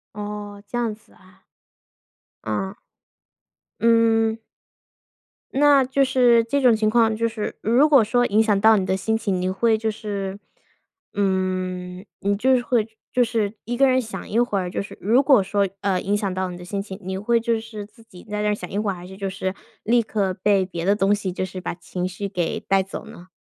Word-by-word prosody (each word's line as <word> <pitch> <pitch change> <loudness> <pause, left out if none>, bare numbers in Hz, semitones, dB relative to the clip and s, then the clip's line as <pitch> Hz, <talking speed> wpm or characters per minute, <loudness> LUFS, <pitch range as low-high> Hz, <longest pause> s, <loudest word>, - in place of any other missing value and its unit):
哦， 205 -1 -6
这 240 - -5
样 230 -3 -1
子 215 - -27
啊。 185 0 -22 1.0
啊。 190 - -3 1.0
嗯。 225 -1 +3 1.1
那 285 0 +5
就 275 +2 +2
是 245 -3 +4
这 280 +5 -1
种 245 -3 +5
情 215 0 +1
况 225 -1 +3
就 230 +1 0
是 225 -2 -4
如 245 +7 +4
果 280 -6 +6
说 245 +3 +2
影 215 -1 +3
响 210 -3 +2
到 220 +1 +6
你 190 - 0
的 190 - 0
心 220 +3 0
情， 195 -4 -1
你 185 - 0
会 220 +4 +2
就 220 0 -1
是， 200 -2 -5 0.7
嗯 185 -2 -2
你 200 +1 0
就 260 +6 +3
是 250 - +1
会 240 -3 +1 0.2
就 250 - +3
是 225 -3 -1
一 240 +2 -4
个 275 +1 +5
人 260 0 +3
想 220 -3 -8
一 225 - +1
会 240 -5 +1
儿 180 -1 -3
就 - - -3
是 200 - -10
如 230 +7 +3
果 265 -6 +5
说， 200 +1 0
呃， 190 -2 0
影 205 +2 0
响 200 -2 -2
到 185 0 -2
你 175 - -7
的 175 - -10
心 200 +2 -3
情， 195 -1 -8
你 190 0 -4
会 230 +4 +1
就 230 -1 0
是 220 -2 -8
自 220 +2 -20
己 180 -5 -15
在 210 0 -4
那 210 - +1
儿 210 - +1
想 180 -3 -8
一 200 - -4
会 210 -1 0
儿， - - -3
还 175 0 -10
是 190 - -11
就 195 0 -3
是 190 0 -3 0.3
立 235 +2 +3
刻 205 -4 -1
被 195 0 +2
别 170 -2 -6
的 200 +3 +3
东 200 0 +2
西 200 -2 -4
就 185 +1 -3
是 185 0 -7
把 - - -3
情 180 +1 -4
绪 185 +2 -5
给 180 -4 -2
带 195 -1 +1
走 195 - -8
呢？ 175 - -13
210 Hz, 230 characters per minute, -23 LUFS, 190-230 Hz, 1.1 s, 果